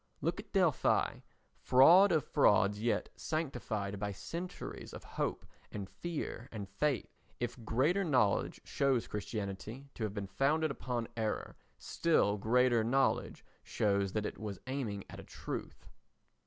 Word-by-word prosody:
Look - - -1
at - - -10
Delphi—fraud 130 - +4
of 155 -5 +2
frauds, 105 +1 +3
yet 115 +1 0
sanctified 115 -10 -3
by 105 0 -2
centuries 170 - -6
of - - -8
hope - - -3 0.3
and 100 -2 -5
fear 155 - -5
and 105 -3 -6
faith. 125 +6 -2 0.2
If 120 0 -4
greater 150 - +2
knowledge 125 - +2
shows 135 -4 +1
Christianity 105 +5 -5
to 115 - -5
have 105 -1 -3
been 100 -1 -3
founded 145 +10 +1
upon 125 -4 -3
error, 110 -2 -2 0.2
still 105 - +1
greater 120 +1 +3
knowledge 130 +4 +1 0.2
shows 100 -2 0
that 110 -1 -1
it - - -5
was 105 -4 -5
aiming 125 -7 -3
at - - -10
a - - -8
truth. - - -7
115 Hz, 135 wpm, -33 LUFS, 100-140 Hz, 0.3 s, Delphi—fraud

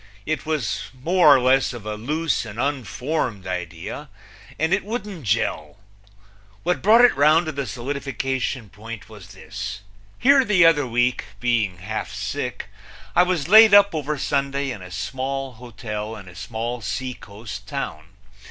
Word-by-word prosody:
It 155 0 -3
was 155 -7 -2
more 175 +5 +3
or - - +4
less 130 +1 +3
of 115 -4 -9
a 110 - -3
loose 150 +9 -1
and 110 -1 -9
unformed 125 - -2
idea, 90 -2 -5 0.5
and 160 +4 +1
it 195 - +1
wouldn't 205 - -5
jell. 75 -8 -1 0.9
What 175 -5 0
brought 225 +5 +7
it - - +3
round 155 +4 +4
to 155 - -2
the 140 -3 -4
solidification 130 0 -3
point 110 +1 -9
was 105 -5 -12
this: 100 +2 -7 0.4
Here 275 +2 +5
the 200 -7 +4
other 145 -5 +4
week, 120 +1 +1
being 115 -7 0
half 105 +5 -5
sick, - - -4 0.5
I 175 - +7
was 180 -5 0
laid 215 +1 +9
up 200 -1 +6
over 150 -1 -2
Sunday 140 0 -1
in 105 - -7
a 90 - -10
small 130 +8 -4
hotel 110 -2 -6
in 100 -3 -11
a 90 - -12
small 115 +5 -5
seacoast 105 -1 -6
town. 75 +1 -5
130 Hz, 150 wpm, -23 LUFS, 105-155 Hz, 0.9 s, laid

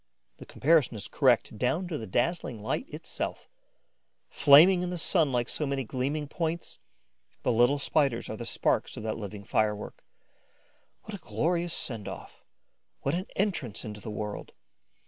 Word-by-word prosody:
The - - -12
comparison 145 -3 +2
is 105 - -6
correct 120 -6 +2
down 160 - 0
to 165 - -3
the 110 - -6
dazzling 120 - -1
light 180 - -3
itself. - - -5 0.8
Flaming 165 +6 +7
in 180 - -2
the 180 - -3
sun 160 -3 +2
like 120 -1 0
so 150 - -2
many 135 -1 -1
gleaming 140 +5 -2
points, 165 +2 -4 0.6
the - - +2
little 120 +5 +4
Spiders 140 -3 +1
are - - -5
the 120 - -6
sparks 115 - 0
of - - -6
that 110 0 -3
living 100 -1 -7
firework. 105 0 -1 1.0
What - - -9
a - - -6
glorious 170 +1 0
send 115 -6 -2
off! - - -9 0.6
What 140 - -1
an 180 +2 -2
entrance 175 - -1
into 105 -1 -7
the 110 - -7
world! 105 0 -5
135 Hz, 160 wpm, -28 LUFS, 110-165 Hz, 1.0 s, Flaming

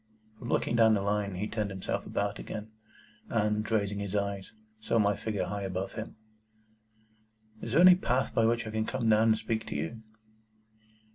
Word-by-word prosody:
From 120 - -7
looking 115 - +1
down 110 -1 +5
the 100 - -1
Line, 100 -1 -1
he 100 +4 -2
turned 105 -2 -2
himself 95 -1 -4
about 100 +1 -2
again, 110 0 -7 0.6
and, 105 -1 0
raising 100 -2 0
his 100 0 -4
eyes, 100 -1 -2 0.3
saw 110 - 0
my 105 -2 +3
figure 105 0 -2
high 100 0 -4
above 95 0 -3
him. 110 0 -7 1.5
"Is 115 - -5
there 165 - +5
any 180 0 +10
path 130 -8 0
by 115 -1 +3
which 115 0 +1
I 110 - -5
can 110 0 -1
come 125 -3 -1
down 110 +1 +5
and 110 -1 +4
speak 110 0 -3
to - - -5
you?" 80 +10 -4
105 Hz, 185 wpm, -30 LUFS, 100-115 Hz, 1.5 s, any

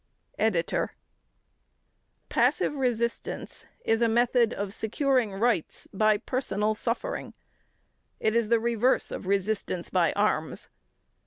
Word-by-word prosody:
EDITOR: - - 0 1.3
Passive - - +2
resistance 240 -4 -2 0.2
is 225 +1 +2
a 235 - +4
method 235 0 +3
of 200 -3 -4
securing 245 +1 +1
rights 200 -4 0
by 215 +1 +3
personal 215 -4 -1
suffering; 235 - -3 0.8
it 220 - +1
is 235 -2 +2
the 235 -1 +4
reverse 235 +2 +1
of - - -6
resistance 195 -2 -1
by - - +3
arms. - - -1
230 Hz, 105 wpm, -27 LUFS, 210-245 Hz, 1.3 s, a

